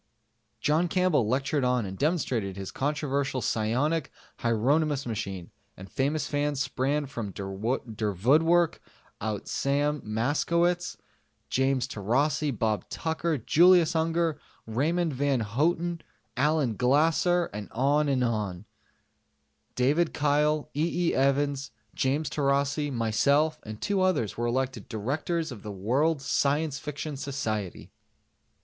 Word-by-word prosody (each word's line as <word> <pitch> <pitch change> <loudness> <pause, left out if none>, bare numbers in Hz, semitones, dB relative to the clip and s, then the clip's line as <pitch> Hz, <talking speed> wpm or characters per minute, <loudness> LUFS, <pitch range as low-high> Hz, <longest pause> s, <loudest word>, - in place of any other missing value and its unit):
John 160 +4 +2
Campbell 175 - +2
lectured 135 +4 0
on 125 -3 +1
and 95 0 -6
demonstrated 125 - -1
his 95 -1 -6
controversial 140 -2 -1
psionic 130 +8 0 0.3
Hieronymus 140 +5 +1
machine, 100 -6 -5 0.3
and 95 0 -11
famous 145 +3 0
fans 145 -1 -1
sprang 140 +2 0
from 115 -6 -5
der 100 0 -6 0.7
vood 120 - +3
work 170 0 +2 0.4
out 105 -1 -3
Sam 145 +1 0
Moskowitz, 170 +10 0 0.5
James 130 -1 +1
Taurasi, 135 +8 0
Bob 110 -4 -1
Tucker, 160 0 -1
Julius 170 +6 +5
Unger, 165 -1 +1 0.3
Raymond 155 +8 0
Van 135 -1 +1
Houten, 165 - 0 0.3
Allen 140 -3 +1
Glasser... 160 - +2 2.2
David 150 +7 +2
Kyle, 150 +1 +2
E. 170 +3 +1
E. - - 0
Evans, 140 +1 +1 0.2
James 140 +4 0
Taurasi, 140 +1 0
myself 135 +7 +2
and 110 0 -8
2 200 -2 0
others 165 - +1
were 120 +1 -1
elected 130 -3 -2
Directors 150 +9 -2
of 115 -5 -8
the 105 - -6
World 135 - 0
Science 145 +1 +1
Fiction 150 0 -5
Society. 110 -9 -4
140 Hz, 110 wpm, -27 LUFS, 120-155 Hz, 2.2 s, Julius